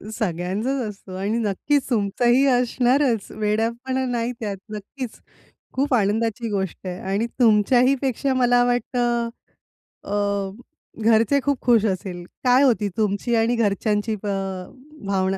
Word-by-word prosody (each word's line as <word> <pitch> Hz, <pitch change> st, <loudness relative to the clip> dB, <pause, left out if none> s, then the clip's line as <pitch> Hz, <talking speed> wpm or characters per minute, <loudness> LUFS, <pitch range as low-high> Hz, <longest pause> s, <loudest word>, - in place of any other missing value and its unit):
सगळ्यांचाच 205 Hz, +7 st, -2 dB
असतो 195 Hz, -2 st, -10 dB
आणि 205 Hz, +4 st, -1 dB
नक्कीच 235 Hz, +6 st, 0 dB
तुमचाही 240 Hz, +4 st, +2 dB
असणारच. 250 Hz, -1 st, +2 dB
वेड्यापणा 235 Hz, +5 st, -1 dB
नाही 240 Hz, -1 st, -1 dB
त्यात 205 Hz, -4 st, -3 dB, 0.2 s
नक्कीच. 225 Hz, +4 st, -7 dB, 0.5 s
खूप 275 Hz, +1 st, 0 dB
आनंदाची 225 Hz, +1 st, +1 dB
गोष्ट 190 Hz, -2 st, -3 dB
आहे 180 Hz, 0 st, -5 dB
आणि 210 Hz, +4 st, 0 dB
तुमच्याही 245 Hz, +3 st, +4 dB
पेक्षा 270 Hz, 0 st, 0 dB
मला 245 Hz, -1 st, +3 dB
वाटतं 240 Hz, -1 st, 0 dB, 0.7 s
अ, 200 Hz, -1 st, -1 dB, 0.5 s
घरचे 230 Hz, +5 st, +4 dB
खूप 285 Hz, -2 st, 0 dB
खुश 235 Hz, -3 st, +4 dB
असेल. 185 Hz, -3 st, -3 dB, 0.2 s
काय 255 Hz, +1 st, +5 dB
होती 215 Hz, -6 st, +2 dB
तुमची 215 Hz, +2 st, 0 dB
आणि 230 Hz, +2 st, +2 dB
घरच्यांची 210 Hz, 0 st, 0 dB
अ, -, -, -3 dB, 0.8 s
भावना? 190 Hz, -1 st, 0 dB
230 Hz, 120 wpm, -23 LUFS, 205-245 Hz, 0.8 s, काय